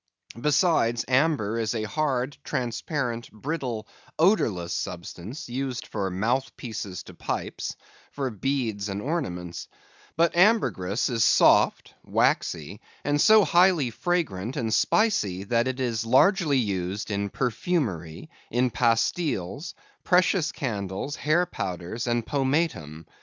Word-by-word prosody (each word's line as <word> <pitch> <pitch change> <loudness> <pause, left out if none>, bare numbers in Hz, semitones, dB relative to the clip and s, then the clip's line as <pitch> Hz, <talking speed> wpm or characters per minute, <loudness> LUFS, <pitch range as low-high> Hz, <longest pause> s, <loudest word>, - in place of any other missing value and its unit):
Besides, 150 -6 +2
amber 125 -5 +2
is 115 +1 -1
a 110 - -1
hard, 135 +2 -1
transparent, 120 0 -3
brittle, 120 -3 -4 0.3
odorless 115 - +2
substance, 90 - -6
used 130 0 -3
for 100 -3 -3
mouth 115 +9 -1
pieces 110 -6 -6
to - - -12
pipes, - - -4 0.4
for 135 -3 -3
beads 110 -3 -2
and 100 0 -3
ornaments; 90 - -4 0.5
but 170 0 +3
ambergris 170 - +3
is 115 -4 +1
soft, - - +4
waxy, - - 0 0.2
and 145 0 +1
so 220 -1 +7
highly 175 -8 +4
fragrant 125 - -2
and 110 -2 -1
spicy, 105 - +2
that 115 +4 +1
it 130 0 -3
is 115 -4 -1
largely 150 - +4
used 100 -2 -2
in 100 0 -1
perfumery, 115 - -2 0.2
in 125 +1 +1
pastiles, 125 - 0 0.3
precious 180 -2 +3
candles, 105 +2 -4
hair 165 +4 +2
powders, 90 - -4
and 120 -1 0
pomatum. 135 - -1
120 Hz, 115 wpm, -26 LUFS, 105-150 Hz, 0.5 s, so